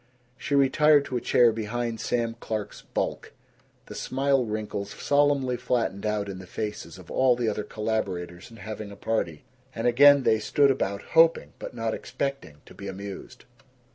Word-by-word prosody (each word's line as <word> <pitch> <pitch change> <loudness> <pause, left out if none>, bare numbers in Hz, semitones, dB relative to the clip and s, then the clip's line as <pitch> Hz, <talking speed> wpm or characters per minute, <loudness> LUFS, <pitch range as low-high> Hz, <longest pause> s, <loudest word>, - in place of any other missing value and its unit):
She 140 +2 -2
retired 145 +1 +4
to 130 - -3
a - - -3
chair 120 0 +4
behind 115 +1 -3
Sam 115 -1 -1
Clark's 110 -3 -5
bulk. - - -4 0.5
The - - -10
smile 135 0 +1
wrinkles 105 -2 -4
solemnly 140 -1 +1
flattened 120 -5 -1
out 105 -1 -1
in 95 -2 -6
the 95 - -11
faces 105 +2 -5
of - - -13
all 130 -1 +3
the 120 -1 -1
other 105 0 -1
collaborators 95 -5 -3
in 115 - -14
having 110 +1 -7
a 100 - -10
party, 85 -9 -2 0.3
and 115 - -3
again 140 +3 +6
they 110 -2 +3
stood 140 +6 +3
about 100 -6 -2
hoping 165 0 +4
but - - -7
not 115 -1 -2
expecting 135 - -5
to - - -14
be 100 - -9
amused. 100 +1 -8
115 Hz, 170 wpm, -26 LUFS, 105-130 Hz, 0.5 s, again